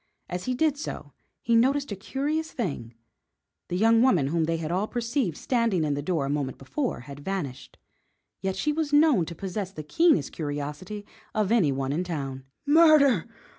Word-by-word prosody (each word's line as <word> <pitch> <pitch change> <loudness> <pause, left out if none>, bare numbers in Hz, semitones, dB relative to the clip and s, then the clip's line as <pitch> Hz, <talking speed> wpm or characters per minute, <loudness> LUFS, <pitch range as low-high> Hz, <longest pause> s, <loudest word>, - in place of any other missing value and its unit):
As 180 0 -4
he 255 - -1
did 300 +1 +2
so - - -6 0.3
he 235 - +2
noticed 275 +3 +2
a - - -2
curious 295 +10 -2
thing. 140 - -4 0.7
The 180 - -2
young 225 +3 +5
woman 180 - +3
whom 165 +1 +1
they 165 +1 0
had 160 0 -4
all 190 +4 0
perceived 235 - -1
standing 230 -9 +1
in 150 -2 0
the 145 - -2
door 155 -2 -1
a - - -3
moment 140 -3 -2
before 245 - -3
had 140 +3 -10
vanished, 145 -5 -5 0.6
yet 190 -1 -1
she 300 +10 0
was 310 -1 -1
known 290 - +5
to 170 - -7
possess 190 +2 -4
the 155 -5 -7
keenest 175 - +3
curiosity 150 +7 -5 0.3
of 215 -1 +1
any 195 -12 +4
one 135 0 -2
in 170 +4 0
town. 135 -6 -5 0.2
"Murder! 290 - +5
190 Hz, 180 wpm, -26 LUFS, -, 0.7 s, young